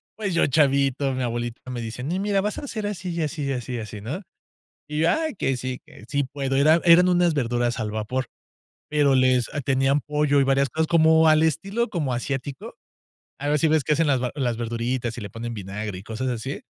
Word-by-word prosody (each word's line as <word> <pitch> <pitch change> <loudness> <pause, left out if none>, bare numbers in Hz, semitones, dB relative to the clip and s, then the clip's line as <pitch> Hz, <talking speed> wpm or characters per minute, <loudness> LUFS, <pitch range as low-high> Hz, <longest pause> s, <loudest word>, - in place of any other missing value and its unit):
pues 200 -5 -3
yo, 170 - +3
chavito, 140 -1 +2
mi 130 0 -2
abuelita 120 0 -3
me 120 -1 -4
dice: 115 +2 -6
"No, 175 +7 -2
mira, 200 -1 +1
vas 210 +1 -2
a 285 - -6
ser 215 -4 -3
así, 185 -3 -4
y 170 - -2
así, 150 -1 -3
y 135 - -1
así, 125 0 -5
y - - -3
así", 105 -1 -7
¿no? 145 - -5 0.7
Y 150 0 -3
yo: 165 - +4
"Ay, 315 -6 -1
que 135 -7 -1
sí, 125 0 -4
que - - -15
sí - - -13
sí 140 -1 +1
puedo". 135 0 -3
Era 155 +4 +5
eran 180 +1 +7
unas 175 -2 +3
verduras 120 -3 0
al 105 -1 -2
vapor, 110 +3 -2 0.6
pero 145 -3 +3
les 130 -2 +3 0.2
tenían 135 +1 +2
pollo 150 -1 +1
y - - +4
varias 135 0 +2
cosas, 160 +3 -1
como 160 0 +5
al 155 0 +5
estilo 195 +9 0
como 150 -9 -2
asiático, 135 +2 -4 0.6
a 145 +1 -3
ver 150 0 +2
si 160 - +3
ves 155 -3 +2
que - - +1
hacen 165 +1 +2
las 135 -3 +2
va 125 - -2
las 125 -5 -1
verduritas 120 +1 -2
y - - -4
le 100 - -7
ponen 115 0 -6
vinagre 100 0 -5
y - - -10
cosas 115 +4 -4
así 125 +3 -4
135 Hz, 230 wpm, -24 LUFS, 120-160 Hz, 0.7 s, eran